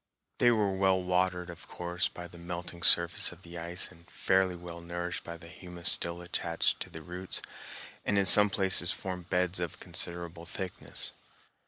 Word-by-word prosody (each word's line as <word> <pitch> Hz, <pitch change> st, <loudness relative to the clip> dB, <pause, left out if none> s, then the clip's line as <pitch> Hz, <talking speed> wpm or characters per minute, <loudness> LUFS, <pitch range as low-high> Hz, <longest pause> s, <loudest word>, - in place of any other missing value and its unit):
They 120 Hz, -, +6 dB
were 105 Hz, -4 st, +2 dB
well 95 Hz, 0 st, +2 dB
watered, 90 Hz, -1 st, 0 dB
of 85 Hz, -, -13 dB
course, 85 Hz, -1 st, -2 dB
by 90 Hz, 0 st, -9 dB
the 85 Hz, 0 st, -14 dB
melting 85 Hz, 0 st, -6 dB
surface 85 Hz, 0 st, +8 dB
of 90 Hz, +1 st, -15 dB
the 85 Hz, 0 st, -8 dB
ice 85 Hz, +2 st, 0 dB
and 85 Hz, +1 st, -19 dB
fairly 95 Hz, +1 st, +1 dB
well 85 Hz, -1 st, -9 dB
nourished 85 Hz, +1 st, -5 dB
by 85 Hz, 0 st, -8 dB
humus 85 Hz, +1 st, -3 dB
still 85 Hz, +1 st, -2 dB
attached 85 Hz, -1 st, -1 dB
to -, -, -6 dB
the 80 Hz, -, -10 dB
roots, 90 Hz, +2 st, -6 dB, 0.6 s
and 100 Hz, -, 0 dB
in 100 Hz, -, +3 dB
some 105 Hz, +3 st, +6 dB
places 95 Hz, -3 st, +2 dB
formed 90 Hz, -2 st, -6 dB
beds 90 Hz, 0 st, 0 dB
of 85 Hz, -3 st, -4 dB
considerable 85 Hz, -1 st, -4 dB
thickness. 95 Hz, 0 st, -4 dB
90 Hz, 170 wpm, -30 LUFS, 85-90 Hz, 0.6 s, surface